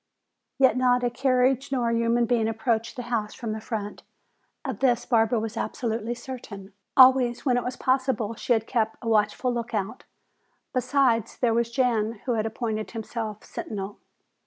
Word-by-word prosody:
Yet 260 -3 +4
not 250 -1 +3
a 245 - +1
carriage 260 +1 +1
nor 245 -3 +1
a - - +1
human 230 +1 +2
being 230 -2 +1
approached 225 +1 -1
the 245 - -5
house 230 -3 -2
from 230 -3 -4
the 220 0 -4
front. 215 -2 -5 0.6
Of 260 -7 -4
this 250 -3 +2
Barbara 225 -1 +2
was 220 +1 -4
absolutely 230 0 -2
certain. 220 -6 -9 0.2
Always 255 -1 +6
when 255 -3 +3
it 245 - 0
was 250 - -3
possible 255 -4 0
she 240 - 0
had 225 -1 0
kept 225 -3 -1
a - - -5
watchful 220 +3 +1
lookout. 225 -4 -3 0.7
Besides, 255 -3 +1
there 235 -3 +2
was 235 0 +1
Jan 235 -3 +1
who 255 - 0
had 220 -2 0
appointed 220 -1 -3
himself 220 -2 -5
sentinel. 200 -1 -6
235 Hz, 165 wpm, -26 LUFS, 220-250 Hz, 0.7 s, Always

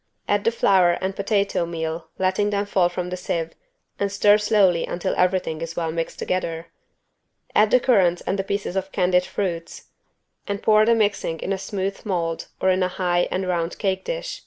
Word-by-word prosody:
Add 205 0 +1
the 230 - +4
flour 190 -6 +4
and 190 +2 -3
potato 200 -4 0
meal 160 -1 -4
letting 190 +2 +1
them 205 0 -1
fall 185 -3 +2
from 180 0 -4
a - - -2
sieve 170 -2 -3 0.5
and 200 -1 0
stir 205 +1 +4
slowly 200 -5 +3
until 180 +2 -2
everything 180 -3 0
is 165 0 -5
well 165 -2 -1
mixed 165 0 -4
together. 165 -2 -3 0.8
Add 210 0 +4
the 250 - +5
currants 190 -9 +3
and 195 - -1
the - - 0
pieces 200 -1 -3
of 190 0 -2
candied 180 -1 +2
fruits 180 -3 -4 0.6
and 200 0 -3
pour 215 0 +5
the 230 - +5
mixing 205 -6 0
in 195 - -1
a - - -2
smooth 195 0 -4
mold 170 -5 -2
or 190 - +3
in 185 0 +1
a 185 - +3
high 175 -1 0
and 185 0 -2
round 170 -1 -1
cake 190 -2 -1
dish. - - -4
185 Hz, 190 wpm, -23 LUFS, 175-200 Hz, 0.8 s, the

